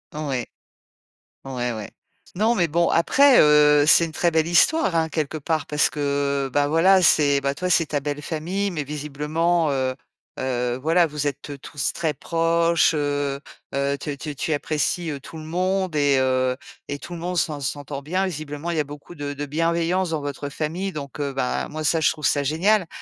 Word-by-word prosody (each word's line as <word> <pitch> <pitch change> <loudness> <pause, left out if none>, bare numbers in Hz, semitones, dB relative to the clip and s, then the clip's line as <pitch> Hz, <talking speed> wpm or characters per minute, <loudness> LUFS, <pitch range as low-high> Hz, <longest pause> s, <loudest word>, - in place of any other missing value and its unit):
Ouais. 140 -5 -3 1.0
Ouais, 125 -2 -3
ouais. 110 -2 -7 0.5
Non, 220 +5 +2
mais 175 -5 +1
bon, 170 +2 +2
après, 270 +10 +5
heu, 150 -1 +6
c'est 165 +2 +6
une 160 - -9
très 175 - +1
belle 160 -1 +2
histoire, 180 - +3
hein, 160 0 +1
quelque 155 -1 -2
part, 155 0 -2
parce 150 -1 +2
que 140 -1 -1
bah 145 +1 +2
voilà, 185 +5 +4
c'est, 145 -4 +4
bah, 140 0 0
toi, 180 +5 -3
c'est 170 -2 +3
ta 145 -1 -2
belle 145 +1 -4
famille, 180 +7 -2
mais 155 -4 -3
visiblement, 150 +3 -1
heu 130 -1 0 0.5
heu, 125 -1 -1
voilà, 165 +2 +3
vous 150 -1 -4
êtes, 140 +1 -7
heu, 140 - -7
tous 145 +1 -3
très 160 -3 -2
proches, 165 +2 +2
heu 145 -2 -1 0.3
heu, 140 0 0
te 145 - -4
te 150 +2 -6
tu 145 +2 -3
apprécies, 155 +3 -1
heu, 140 -2 -5
tout 160 - -11
le 155 - -8
monde 185 +2 -1
et 145 -1 +3
heu, 130 -1 +1 0.3
et 145 0 -4
tout 175 - -10
le 170 - -6
monde 180 +1 -3
s'en 155 -3 0
s'entend 140 0 -4
bien. 185 +7 -1
Visiblement, 155 -1 -5
il 165 - -1
y - - +3
a 150 - 0
beaucoup 145 +4 -11
de 145 -2 -5
de 145 +1 -5
bienveillance 170 +4 0
dans 160 -2 -2
votre 145 0 -5
famille, 165 +6 -3
donc, 145 -2 -7
heu, 140 -2 -2
ben 130 -2 -1
moi 155 +1 -5
ça, 165 +2 +2
je 155 - +4
trouve 155 -2 -7
ça 145 - +2
génial. 180 +8 +2
150 Hz, 200 wpm, -23 LUFS, 140-170 Hz, 1.0 s, heu